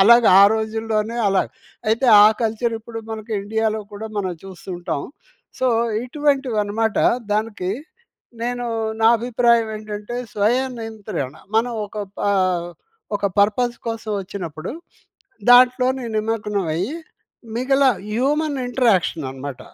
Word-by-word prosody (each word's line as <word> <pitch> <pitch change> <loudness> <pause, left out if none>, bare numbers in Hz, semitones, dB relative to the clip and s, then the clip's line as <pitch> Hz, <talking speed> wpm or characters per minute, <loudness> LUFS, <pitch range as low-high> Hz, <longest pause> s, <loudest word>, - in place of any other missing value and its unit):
అలాగ 235 +4 +7 0.2
ఆ - - +9
రోజుల్లోనే 220 0 -2
అలా! 195 -1 +3 0.5
అయితే 230 +4 +2 0.2
ఆ - - +9 0.2
కల్చర్ 225 +1 0
ఇప్పుడు 225 +1 -8
మనకు 220 +1 -7
ఇండియాలో 220 +1 -1
కూడా 210 +2 -6
మనం 185 -3 -1
చూస్తూ 190 0 -10
ఉంటాం. 170 -5 -3 0.6
సో, 260 - +1 0.4
ఇటువంటివి 275 -3 0
అన్నమాట 220 +1 -1 0.3
దానికి 210 -4 -1 0.7
నేను 245 +1 -2 0.4
నా 225 - +6
అభిప్రాయం 235 -1 +2
ఏంటంటే 215 +2 -6 0.2
స్వయ 215 +4 +2 0.2
నియంత్రణ 210 - -5 0.2
మనం 240 +2 +2
ఒక 210 - -9 0.2
ప - - -5 1.0
ఒక 200 0 -1
పర్పస్ 235 +4 +2
కోసం 225 -1 -4
వచ్చినప్పుడు 180 -4 -6 0.8
దాంట్లోనే 255 +1 +5
నిమగ్నమయ్యి 210 - -1 0.6
మిగల 270 +2 +2 0.3
హ్యూమన్ 285 +4 0
ఇంటరాక్షన్ 225 - +1
అన్నమాట! 135 0 -7
220 Hz, 110 wpm, -21 LUFS, 205-245 Hz, 1.0 s, ఆ